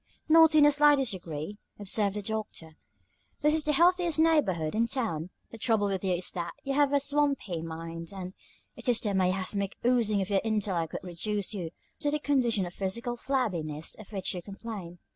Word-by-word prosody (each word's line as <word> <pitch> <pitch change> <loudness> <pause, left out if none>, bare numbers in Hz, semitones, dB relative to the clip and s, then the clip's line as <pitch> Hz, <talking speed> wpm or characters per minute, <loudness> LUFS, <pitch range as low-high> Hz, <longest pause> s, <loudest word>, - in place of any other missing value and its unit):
"Not 320 0 +6
in 300 - +7
the 295 - +7
slightest 290 -4 +4
degree," 175 +1 -6 0.2
observed 205 0 +1
the 210 - -4
Doctor. 215 -6 -4 0.7
"This 300 +1 +4
is 315 -1 +1
the 300 - +2
healthiest 345 +1 +3
neighborhood 255 - +2
in 230 +2 +1
town. 215 - -2 0.2
The 230 - -10
trouble 215 -3 +2
with 190 -1 -2
you 185 -2 +1
is 175 +1 +1
that 170 -2 -4
you 275 - -2
have 285 0 +3
a 285 - +3
swampy 280 - 0
mind, 165 0 -7
and 185 -2 -7 0.4
it - - -2
is 240 - +4
the 210 -4 -2
miasmatic 190 +1 -1
oozings 225 -5 +2
of 190 - -8
your 195 - +3
intellect 200 -7 -1
that - - -5
reduce 200 +4 -3
you 180 -5 -4 0.3
to 290 - 0
the 300 - 0
condition 250 -9 +1
of 175 - -8
physical 230 +6 -3
flabbiness 180 - -2
of 215 -1 -13
which 195 -3 -1
you 180 - -5
complain. 195 -3 -8
210 Hz, 190 wpm, -29 LUFS, 180-270 Hz, 0.7 s, in